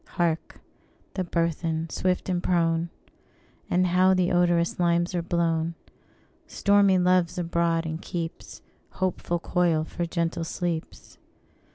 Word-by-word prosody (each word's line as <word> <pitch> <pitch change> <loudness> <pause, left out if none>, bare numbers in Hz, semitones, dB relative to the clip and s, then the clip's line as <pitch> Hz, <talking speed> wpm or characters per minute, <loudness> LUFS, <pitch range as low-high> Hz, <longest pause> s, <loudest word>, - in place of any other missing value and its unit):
Hark! 170 -2 -1 0.5
the 185 - -1
burthen, 165 -1 -1
swift 185 -1 -1
and 180 -2 0
prone! 170 -1 +1 0.8
And 180 +1 +2
how 185 +1 +4
the 180 -1 +1
odorous 175 -1 +2
limes 175 0 +2
are 175 - 0
blown! 170 -1 0 0.7
Stormy 200 -1 +3
Love's 180 -1 +2
abroad, 170 -1 0
and 160 +1 -4
keeps 170 -2 -6 0.3
Hopeful 185 -2 -1
coil 170 -2 +1
for 170 +2 -4
gentle 170 -1 -1
sleeps. 170 -1 -5
170 Hz, 120 wpm, -26 LUFS, 165-180 Hz, 0.8 s, how